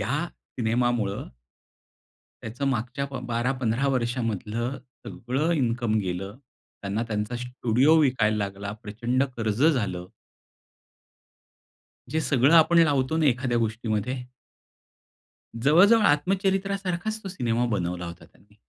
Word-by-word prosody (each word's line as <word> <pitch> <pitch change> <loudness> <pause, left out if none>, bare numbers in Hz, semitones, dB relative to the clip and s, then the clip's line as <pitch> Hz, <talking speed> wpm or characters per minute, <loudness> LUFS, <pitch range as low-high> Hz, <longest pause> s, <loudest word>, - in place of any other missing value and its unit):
या 125 +8 -1 0.4
सिनेमामूळ, 120 -3 0 1.3
त्याचं 120 +5 -4
मागच्या 135 +3 -2
ब 135 - -6
12-15 125 +1 0
वर्षामधलं 120 0 -2 0.3
सगळं 135 +8 -2
इन्कम 120 -5 0
गेलं. 95 +3 -4 0.4
त्यांना 100 +3 -2
त्यांचा 105 +2 -2
स्टुडिओ 125 +4 +2
विकायला 115 -6 +2
लागला. 100 0 -4
प्रचंड 120 +5 -1
कर्ज 110 +3 0
झालं. 100 - 0 2.0
जे 160 0 0
सगळं 140 +1 +3
आपण 165 +1 +6
लावतो 145 -1 +2
ना 160 - +2
एखाद्या 125 -2 +1
गोष्टीमध्ये. 110 +2 -1 1.5
जवळ-जवळ 200 +9 +6
आत्मचरित्रासारखाच 195 +5 0
तो 195 - -5
सिनेमा 120 -8 -1
बनवला 90 -2 -2
होता 85 +1 -9
त्यांनी. 105 +1 -26
120 Hz, 105 wpm, -26 LUFS, 110-145 Hz, 2.0 s, आपण